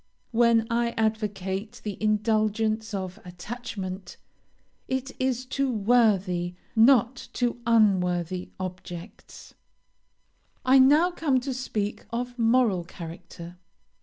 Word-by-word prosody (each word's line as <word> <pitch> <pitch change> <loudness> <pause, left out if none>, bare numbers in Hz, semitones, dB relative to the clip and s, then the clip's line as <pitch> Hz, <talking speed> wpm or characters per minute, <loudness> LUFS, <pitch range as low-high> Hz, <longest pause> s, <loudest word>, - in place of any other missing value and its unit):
When 230 -1 +4
I 235 0 0
advocate 210 -2 -2
the 210 -2 -4
indulgence 215 +1 +1
of 190 -3 -5
attachment, 190 0 -7 0.7
it 260 +1 -2
is 260 -1 0
to 270 +1 -1
worthy, 200 -6 +2 0.2
not 240 +2 +4
to 240 -1 -1
unworthy, 185 -5 +2
objects. 180 0 -8 1.1
"I 265 +1 +6
now 300 +7 +5
come 290 -7 +1
to 270 +1 -3
speak 215 -5 -3
of 245 +1 -4
moral 225 -5 +3
character. 170 0 -10
220 Hz, 100 wpm, -26 LUFS, 185-245 Hz, 1.1 s, I